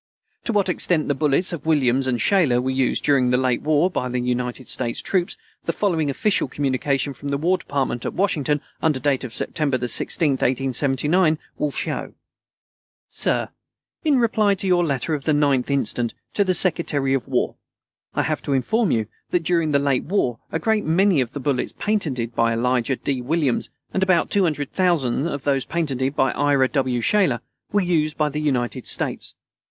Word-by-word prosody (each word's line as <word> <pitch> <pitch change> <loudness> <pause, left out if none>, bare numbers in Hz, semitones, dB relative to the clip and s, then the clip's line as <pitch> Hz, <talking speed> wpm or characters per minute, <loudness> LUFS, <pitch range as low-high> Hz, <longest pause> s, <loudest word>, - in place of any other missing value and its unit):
To - - 0
what 205 -2 +2
extent 175 -3 0
the - - +3
bullets 150 +5 +1
of 160 -2 -6
Williams 135 -4 +2
and 120 -2 0
Shaler 155 - +3
were 130 +1 -1
used 130 -1 0
during 135 -4 +3
the 125 - +3
late 130 -2 +1
war 155 +2 +3
by 125 -9 -3
the 125 0 -1
United 125 +1 -2
States 115 - 0
troops, 180 -2 -1 0.3
the 165 - 0
following 165 -8 0
official 200 +8 +1
communication 135 +1 -1
from 140 +2 -7
the 140 - 0
War 180 +5 +1
Department 135 -4 -2
at - - -4
Washington, 150 -7 0 0.2
under 155 -4 +1
date 135 0 0
of 130 - -6
September 140 +2 0
16, 150 +5 +1
1879, 135 +6 +1 0.2
will 150 - 0
show: - - -3 1.0
Sir - - 0 0.5
In 300 -4 +3
reply 215 -4 +2
to 195 - -6
your 180 -2 +3
letter 145 0 -1
of 145 -3 -3
the 155 - +2
9th 140 -3 +2
instant 120 -3 0 0.2
to 205 - +3
the 185 -2 +1
Secretary 150 -6 +1
of 135 -1 -1
War, 130 -2 0 0.6
I - - +1
have - - -1
to 140 - -2
inform 220 - +1
you 110 -5 +1 0.2
that 175 -2 0
during 165 -1 +1
the 145 - +3
late 140 -2 0
war 145 - 0
a - - 0
great 215 +5 +1
many 175 -1 +3
of 125 -1 -4
the 145 - -4
bullets 135 -2 -1
patented 140 - -1
by 115 0 +2
Elijah 125 +2 +1
D. 130 0 -3
Williams 145 -1 0 0.2
and 190 - 0
about 185 -3 +2
200,000 160 -5 +1
of 140 -5 -4
those 135 -2 +1
patented 140 -5 -1
by 135 - +2
Ira 140 -2 +2
W. 130 -4 0
Shaler 165 - +2 0.3
were 205 - +2
used 160 -4 0
by 150 -1 +1
the 150 +1 -3
United 130 -3 -1
States. - - -2
145 Hz, 180 wpm, -22 LUFS, 130-170 Hz, 1.0 s, the